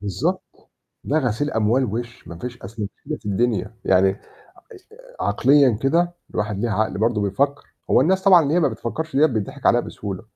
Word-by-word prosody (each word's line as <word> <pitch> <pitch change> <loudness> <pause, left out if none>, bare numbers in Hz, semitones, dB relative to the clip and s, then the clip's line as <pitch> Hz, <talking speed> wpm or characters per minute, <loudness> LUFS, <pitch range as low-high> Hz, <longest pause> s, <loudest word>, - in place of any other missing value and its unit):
بالضبط، 100 -3 -3 0.4
ده 155 +3 +1
غسيل 130 +2 -1
أموال 115 +4 +1
وِش، 120 +2 -6
ما 85 0 -9
فيش 125 +2 -7
أصل 105 +3 -7
ما 100 - -2
فيش - - -41
كده 155 +2 -4
في - - -15
الدنيا، 110 0 -1
يعني 95 +1 +4
اش 95 - -6 1.0
عقليًا 135 -6 +3
كده 170 +5 +1 0.2
الواحد 105 -1 -2
ليه 115 +3 -1
عقل 100 -1 -1
برضه 110 -1 +1
بيفكّر، 140 +9 -1 0.2
هو - - +5
الناس 190 +7 +2
طبعًا 185 -4 +7
اللي 145 +3 0
هي 175 - +3
ما 145 - +3
بتفكّرش 135 +6 -5
ديّة 150 +3 +6
بيتضحك 130 +3 -3
عليها 120 - +5
بسهولة، 100 -5 -7
120 Hz, 190 wpm, -22 LUFS, 105-145 Hz, 1.0 s, طبعًا